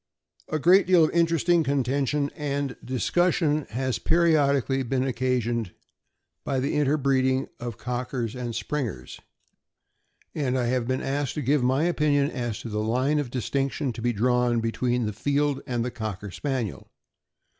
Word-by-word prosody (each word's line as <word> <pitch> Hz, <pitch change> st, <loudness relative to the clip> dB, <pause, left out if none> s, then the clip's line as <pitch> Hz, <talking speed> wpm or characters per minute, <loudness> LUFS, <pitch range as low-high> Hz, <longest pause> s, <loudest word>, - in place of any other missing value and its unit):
A 155 Hz, -, 0 dB
great 180 Hz, +5 st, +5 dB
deal 180 Hz, -3 st, +6 dB
of 155 Hz, -, +2 dB
interesting 170 Hz, 0 st, +3 dB
contention 140 Hz, +1 st, 0 dB
and 140 Hz, -3 st, -2 dB
discussion 155 Hz, +3 st, +1 dB
has 130 Hz, +2 st, -2 dB
periodically 140 Hz, -5 st, +2 dB
been 130 Hz, +1 st, 0 dB
occasioned 120 Hz, -5 st, -1 dB, 0.7 s
by 135 Hz, -, -1 dB
the 135 Hz, +3 st, -1 dB
interbreeding 135 Hz, -2 st, +1 dB
of 120 Hz, -3 st, -5 dB
Cockers 125 Hz, -1 st, -3 dB
and 120 Hz, -2 st, -4 dB
Springers, 115 Hz, 0 st, -4 dB, 1.1 s
and 130 Hz, -4 st, -1 dB
I 125 Hz, -, 0 dB
have 120 Hz, -1 st, 0 dB
been 130 Hz, 0 st, -1 dB
asked 140 Hz, -1 st, -2 dB
to 150 Hz, -, -2 dB
give 140 Hz, +3 st, +2 dB
my 130 Hz, +4 st, +2 dB
opinion 150 Hz, -4 st, +2 dB
as 120 Hz, -4 st, -3 dB
to 115 Hz, -, -6 dB
the 105 Hz, 0 st, -2 dB
line 130 Hz, +7 st, +1 dB
of 145 Hz, -4 st, -3 dB
distinction 135 Hz, +2 st, -2 dB
to 115 Hz, -, -7 dB
be 120 Hz, +1 st, +1 dB
drawn 120 Hz, +1 st, +2 dB
between 120 Hz, +1 st, 0 dB
the 105 Hz, -, -3 dB
Field 145 Hz, +4 st, 0 dB
and 120 Hz, -2 st, -1 dB
the 125 Hz, -, -3 dB
Cocker 105 Hz, -4 st, -5 dB
Spaniel. 120 Hz, -, -3 dB
130 Hz, 150 wpm, -26 LUFS, 120-145 Hz, 1.1 s, deal